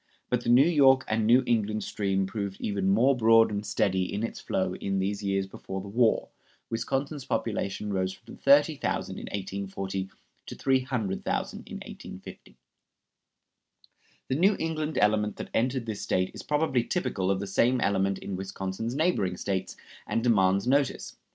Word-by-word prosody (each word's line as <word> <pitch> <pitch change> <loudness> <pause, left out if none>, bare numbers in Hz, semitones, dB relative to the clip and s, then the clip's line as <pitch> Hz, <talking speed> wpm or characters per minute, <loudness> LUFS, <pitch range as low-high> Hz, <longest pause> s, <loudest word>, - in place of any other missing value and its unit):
But 125 -1 +2
the 120 - -3
New 125 +4 +7
York 135 -5 +5
and 110 0 0
New 125 +3 +6
England 110 -3 0
stream 95 -2 -1
proved 100 -1 -4
even 100 -2 -1
more 120 +7 +4
broad 115 -2 +5
and 100 0 -2
steady 95 -2 0
in 105 - -2
its 115 - -4
flow 95 -1 -1
in 95 +1 -2
these 100 +2 -1
years 100 -1 0
before 95 0 -7
the 95 - -8
war. 115 +2 +2 0.4
Wisconsin's 135 +5 -2
population 105 -3 -2
rose 95 -1 0
from - - -13
30,000 145 +2 +2
in - - -7
1840 95 -1 -4 0.4
to - - -7
300,000 125 -7 -1
in - - -8
1850. - - -11 1.7
The 130 - 0
New 195 +7 +4
England 155 -1 -2
element 105 0 +2
that - - -8
entered 125 +1 0
this 110 -3 -4
State 95 0 0
is - - -8
probably 150 -5 +1
typical 100 - -1
of 95 -1 +1
the 100 - -3
same 120 +6 +2
element 100 -2 +1
in 100 - -5
Wisconsin's 95 +4 -4
neighboring 140 - +1
States, 95 -2 -3 0.3
and 115 - -1
demands 100 -4 +3
notice. 135 +1 0
105 Hz, 155 wpm, -28 LUFS, 95-125 Hz, 1.7 s, New